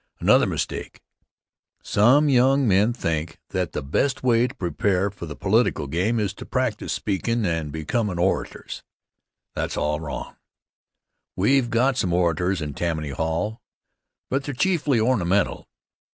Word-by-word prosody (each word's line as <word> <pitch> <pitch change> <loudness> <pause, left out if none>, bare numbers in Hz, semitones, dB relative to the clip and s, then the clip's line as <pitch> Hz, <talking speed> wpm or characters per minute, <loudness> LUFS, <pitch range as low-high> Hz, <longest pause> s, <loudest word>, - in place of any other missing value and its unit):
Another - - +4
mistake: - - -4 0.8
some 130 +9 +4
young 135 0 +4
men 105 +3 +4
think 85 -8 -3
that - - -2
the - - -3
best 130 - 0
way 120 -1 +3
to 125 - -11
prepare 95 -1 0
for 90 -4 -8
the 75 - -7
political 105 -6 +1
game 95 +11 0
is 100 -2 -1
to - - -9
practice 125 -5 -1
speakin' 110 +3 -1
and 80 -4 -1
becomin' 90 - -2
orators. 90 +2 -2 0.7
That's - - -3
all 75 0 0
wrong. 75 -4 -6 1.0
We've 120 +6 +2
got 125 +3 +2
some 90 -8 0
orators 90 +1 +1
in 75 -1 -5
Tammany 80 -2 -2
Hall, 80 - -2 0.7
but 135 +1 0
they're 145 - -4
chiefly 150 -5 +1
ornamental. 100 -5 +1
100 Hz, 135 wpm, -24 LUFS, 85-125 Hz, 1.0 s, Another